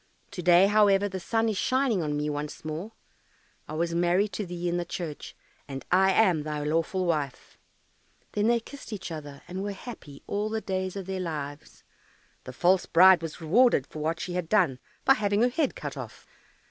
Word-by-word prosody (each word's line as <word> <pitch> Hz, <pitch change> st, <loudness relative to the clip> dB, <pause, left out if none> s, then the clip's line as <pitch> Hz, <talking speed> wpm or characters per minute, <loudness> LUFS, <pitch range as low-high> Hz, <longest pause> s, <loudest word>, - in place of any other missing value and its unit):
To 180 Hz, -, -5 dB
day, 175 Hz, +2 st, +6 dB
however, 205 Hz, -1 st, +4 dB
the 190 Hz, -1 st, -5 dB
sun 225 Hz, +5 st, 0 dB
is 215 Hz, -3 st, -1 dB
shining 255 Hz, -6 st, +1 dB
on 150 Hz, -2 st, -2 dB
me 150 Hz, 0 st, -1 dB
once 150 Hz, +1 st, -5 dB
more. 165 Hz, +8 st, -5 dB, 0.7 s
I -, -, -7 dB
was 170 Hz, +1 st, -1 dB
married 175 Hz, +4 st, +2 dB
to 200 Hz, 0 st, -3 dB
thee 175 Hz, 0 st, -4 dB
in 175 Hz, 0 st, 0 dB
the 175 Hz, -, -1 dB
church, 170 Hz, -3 st, -6 dB, 0.3 s
and 135 Hz, -2 st, -7 dB
I 190 Hz, +2 st, +5 dB
am 185 Hz, -6 st, +3 dB
thy 150 Hz, 0 st, -4 dB
lawful 165 Hz, +5 st, 0 dB
wife." 150 Hz, -6 st, -3 dB, 0.7 s
Then 210 Hz, +1 st, +1 dB
they 235 Hz, 0 st, +3 dB
kissed 280 Hz, +3 st, -11 dB
each 200 Hz, -4 st, -6 dB
other, 145 Hz, -3 st, -8 dB
and 185 Hz, +2 st, -5 dB
were 205 Hz, 0 st, -3 dB
happy 190 Hz, -, -10 dB
all 205 Hz, +1 st, -2 dB
the 220 Hz, 0 st, -1 dB
days 190 Hz, -2 st, -3 dB
of 195 Hz, -2 st, -5 dB
their 190 Hz, 0 st, -4 dB
lives. 150 Hz, -4 st, -6 dB, 0.6 s
The -, -, -7 dB
false 180 Hz, +7 st, +2 dB
bride 185 Hz, 0 st, +7 dB
was 165 Hz, +1 st, -7 dB
rewarded 185 Hz, -, +4 dB
for 155 Hz, -, -9 dB
what 160 Hz, +2 st, -1 dB
she 180 Hz, -, -4 dB
had 175 Hz, -2 st, -3 dB
done 175 Hz, -12 st, +2 dB, 0.3 s
by 270 Hz, -, +7 dB
having 205 Hz, -2 st, +1 dB
her 245 Hz, -, +4 dB
head 290 Hz, +2 st, 0 dB
cut -, -, -6 dB
off. -, -, -9 dB
180 Hz, 200 wpm, -27 LUFS, 155-205 Hz, 0.7 s, bride